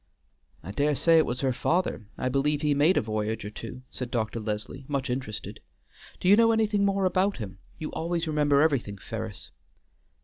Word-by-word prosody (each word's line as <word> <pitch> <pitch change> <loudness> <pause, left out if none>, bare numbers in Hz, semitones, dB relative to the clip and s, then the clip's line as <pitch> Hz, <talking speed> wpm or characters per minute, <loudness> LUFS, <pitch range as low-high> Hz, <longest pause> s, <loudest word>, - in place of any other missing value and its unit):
"I 90 - -6
dare 145 +6 +1
say 165 +3 +5
it 155 - +2
was 125 +1 -2
her 135 -2 +1
father; 160 - 0
I 130 - -1
believe 140 +3 +1
he 150 -1 +3
made 150 +6 +4
a - - +4
voyage 110 0 -2
or 105 - -5
two," 120 +4 -8
said 125 -2 -5
Dr. 115 -1 -2
Leslie, 105 +5 -4
much 140 -2 -1
interested. 125 -5 -4 0.6
"Do - - -2
you 200 - +8
know 230 +1 +5
anything 215 -2 +2
more 195 -1 +2
about 185 +2 +2
him? 95 -4 -7 0.2
you 155 - -5
always 170 0 -2
remember 145 -2 +3
everything, 135 -10 +1
Ferris." 65 -8 -6
140 Hz, 190 wpm, -27 LUFS, 110-165 Hz, 0.6 s, you